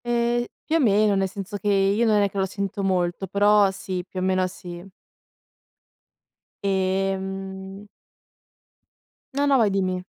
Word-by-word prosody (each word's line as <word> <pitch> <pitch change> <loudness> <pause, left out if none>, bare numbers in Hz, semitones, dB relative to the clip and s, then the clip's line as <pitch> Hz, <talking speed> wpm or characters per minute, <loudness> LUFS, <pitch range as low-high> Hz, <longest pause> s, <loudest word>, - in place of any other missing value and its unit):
Eh, 240 0 +1 0.2
più 320 - +1
o - - +1
meno, 210 -5 +3
nel 195 0 +1
senso 195 +1 -6
che 205 - -5
io 200 +3 +3
non 210 -1 +4
è 200 - +2
che 200 - -7
lo 190 - +2
sento 200 +1 -4
molto, 185 0 0
però 205 +1 +4
sì, 185 -1 -5
più 185 - -5
o - - -2
meno 185 0 +1
sì. 175 -1 -9 1.8
Ehm 190 0 -2 1.5
No, 285 +1 +1
no, 275 -1 +4
vai 225 -4 +4
dimmi. 185 -2 -1
195 Hz, 145 wpm, -24 LUFS, 190-210 Hz, 1.8 s, non